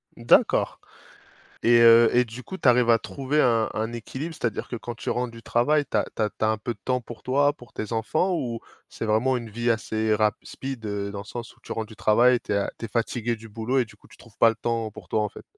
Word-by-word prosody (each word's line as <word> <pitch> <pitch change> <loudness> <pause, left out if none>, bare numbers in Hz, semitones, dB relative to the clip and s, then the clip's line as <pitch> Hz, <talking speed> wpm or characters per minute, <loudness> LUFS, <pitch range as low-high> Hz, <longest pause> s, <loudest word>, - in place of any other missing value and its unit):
D'accord 115 0 +3 0.8
et 120 0 +5
heu 115 0 +8
et 125 - +5
du 120 +3 -9
coup, 190 - -7
tu - - -4
arrives 125 -1 +5
à 115 - +6
trouver 140 +5 -1
un 115 -3 +3
un 110 +2 -2
équilibre? 130 +8 -6
C'est-à-dire 115 -7 -3
que 120 - -4
quand 120 +1 -6
tu - - -4
rentres 125 0 -1
du 115 0 -12
travail, 145 +5 +2
tu - - -16
as - - +2
tu - - 0
as 105 - +1
tu - - -13
as 110 - +3
un 110 - +1
peu 120 - -3
de 105 - -18
temps 125 -1 0
pour 120 0 -11
toi, 145 +3 +2
pour 125 -5 -17
tes 110 +2 -5
enfants, 155 - 0
ou 120 -7 -3 0.3
c'est - - -6
vraiment 115 +5 +2
une 115 -2 -6
vie 120 +2 -1
assez 110 -1 0
rap 105 0 +2
speed, 130 -4 -7
heu, 100 -1 -3
dans 100 - -6
le - - -9
sens 120 +1 -8
où 120 - -29
tu - - -6
rentres 110 -1 -4
du 110 - -13
travail, 120 +4 +4
tu - - -5
es 100 - +2
a 100 - 0
tu 115 - -5
es - - -13
fatigué 115 +1 -1
du 115 +1 -12
boulot 115 +5 -1
et 125 - +3
du 105 - -17
coup, - - -22
tu - - -17
trouves 115 -4 -19
pas 115 - +7
le 115 - +1
temps 115 0 -2
pour 105 -5 -13
toi, 110 - +1
en 105 - -1
fait? - - -13
115 Hz, 275 wpm, -25 LUFS, 110-125 Hz, 0.8 s, heu